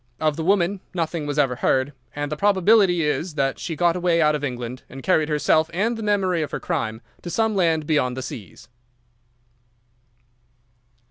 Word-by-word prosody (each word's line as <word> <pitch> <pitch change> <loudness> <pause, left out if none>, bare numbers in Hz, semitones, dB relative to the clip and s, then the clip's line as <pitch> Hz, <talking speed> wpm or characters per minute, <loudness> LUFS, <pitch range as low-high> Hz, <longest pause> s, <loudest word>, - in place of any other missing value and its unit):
Of 155 -1 +1
the 160 - -4
woman 190 +1 +2 0.2
nothing 165 -3 -2
was 145 0 -3
ever 135 -4 +2
heard, 130 +3 +1 0.2
and 145 0 -3
the - - -1
probability 195 -1 +4
is 150 +2 -1
that 135 -2 0
she 165 - -4
got 170 +2 +2
away 175 -2 +1
out 150 -2 +4
of 150 -1 -3
England 125 -2 -4
and 135 +1 -10
carried 160 -5 +2
herself 155 +1 +2
and 225 +6 +1
the 225 - -6
memory 195 -5 +1
of 150 - -2
her - - -4
crime 115 -10 -3 0.2
to 175 - -6
some 220 +3 0
land 165 -5 +2
beyond 140 -5 +1
the 130 - -4
seas." 115 -5 -9
160 Hz, 180 wpm, -23 LUFS, 145-180 Hz, 0.2 s, probability